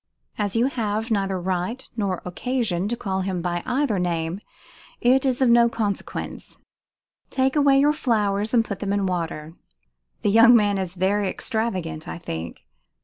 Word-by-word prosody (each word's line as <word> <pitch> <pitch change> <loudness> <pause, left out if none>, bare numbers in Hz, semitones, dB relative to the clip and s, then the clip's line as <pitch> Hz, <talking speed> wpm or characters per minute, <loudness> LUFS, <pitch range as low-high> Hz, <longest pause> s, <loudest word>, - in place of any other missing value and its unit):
"As 205 -1 0
you 230 +2 +3
have 225 -3 -2
neither 195 -3 0
right 185 +7 -3
nor 200 -5 -2
occasion 200 -1 -1
to 240 - -1
call 190 -3 -2
him 185 -1 -2
by 175 0 -2
either 250 -6 +1
name, 170 0 -2 0.6
it 260 +2 +3
is 260 0 +1
of 250 - +4
no 235 0 +6
consequence 210 -4 -4 0.7
Take 265 +1 +1
away 280 -2 +5
your 295 +2 +4
flowers 210 -6 0
and 230 -2 +3
put 200 -4 -5
them 200 -1 -2
in 200 -1 0
water 165 -3 -3 0.7
the 205 - +2
young 230 +3 +7
man 205 -3 +3
is 185 -1 -4
very 195 +2 +1
extravagant, 185 -10 -2
I - - -5
think. 85 - -7
205 Hz, 160 wpm, -23 LUFS, 180-235 Hz, 0.7 s, young